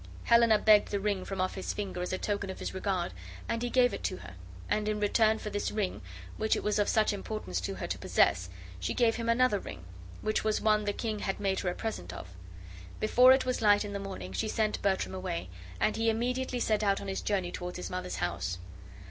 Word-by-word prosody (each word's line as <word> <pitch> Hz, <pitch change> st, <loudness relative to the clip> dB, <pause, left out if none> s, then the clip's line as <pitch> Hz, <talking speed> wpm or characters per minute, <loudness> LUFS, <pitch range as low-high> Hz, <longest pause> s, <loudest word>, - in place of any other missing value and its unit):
Helena 235 Hz, -2 st, +5 dB
begged 210 Hz, 0 st, +5 dB
the 200 Hz, -, -1 dB
ring 200 Hz, -2 st, -1 dB
from 195 Hz, -1 st, -5 dB
off 185 Hz, 0 st, 0 dB
his 190 Hz, -, -3 dB
finger 190 Hz, -3 st, -4 dB
as 180 Hz, -, -3 dB
a 185 Hz, -, 0 dB
token 200 Hz, 0 st, -2 dB
of 190 Hz, -, -5 dB
his -, -, -5 dB
regard, 190 Hz, -2 st, -1 dB, 0.3 s
and 230 Hz, -, -1 dB
he 245 Hz, -, -1 dB
gave 245 Hz, -3 st, +4 dB
it -, -, -4 dB
to -, -, -1 dB
her; 90 Hz, 0 st, -10 dB, 0.3 s
and 210 Hz, 0 st, 0 dB
in 210 Hz, 0 st, -1 dB
return 220 Hz, +1 st, +3 dB
for 210 Hz, -, -6 dB
this 205 Hz, -, -1 dB
ring, 210 Hz, -3 st, -2 dB, 0.4 s
which 220 Hz, 0 st, +2 dB
it -, -, -3 dB
was 210 Hz, 0 st, +1 dB
of 205 Hz, -, +2 dB
such 215 Hz, -1 st, +3 dB
importance 195 Hz, -, -4 dB
to -, -, -3 dB
her -, -, -4 dB
to -, -, -3 dB
possess, 90 Hz, 0 st, +2 dB, 0.3 s
she 90 Hz, -, -2 dB
gave 235 Hz, -2 st, +3 dB
him 230 Hz, -1 st, -2 dB
another 230 Hz, -3 st, +3 dB
ring, 90 Hz, -, -9 dB, 0.4 s
which 215 Hz, -, 0 dB
was 215 Hz, -1 st, +1 dB
one 215 Hz, -1 st, +2 dB
the 205 Hz, -, +1 dB
king 215 Hz, 0 st, -3 dB
had 195 Hz, -, -2 dB
made 195 Hz, -1 st, 0 dB
her 180 Hz, -, -1 dB
a 175 Hz, -, -3 dB
present 155 Hz, -, -4 dB
of. 90 Hz, -, -8 dB, 0.7 s
Before 250 Hz, +4 st, +6 dB
it 265 Hz, 0 st, +4 dB
was 255 Hz, -2 st, -1 dB
light 205 Hz, -1 st, +5 dB
in 205 Hz, -, -5 dB
the 200 Hz, -, -3 dB
morning 190 Hz, -, -6 dB
she 95 Hz, -, -1 dB
sent 215 Hz, -1 st, 0 dB
Bertram 195 Hz, -1 st, 0 dB
away; 90 Hz, -, -4 dB, 0.3 s
and 215 Hz, -, +2 dB
he 225 Hz, 0 st, +2 dB
immediately 250 Hz, +3 st, -1 dB
set 215 Hz, -2 st, +1 dB
out 200 Hz, -2 st, +2 dB
on 200 Hz, -, -7 dB
his 195 Hz, -, -2 dB
journey 190 Hz, -4 st, -1 dB
toward 180 Hz, 0 st, -5 dB
his 180 Hz, -, -5 dB
mother's 180 Hz, 0 st, -3 dB
house. 85 Hz, 0 st, -2 dB
205 Hz, 235 wpm, -30 LUFS, 185-220 Hz, 0.7 s, Before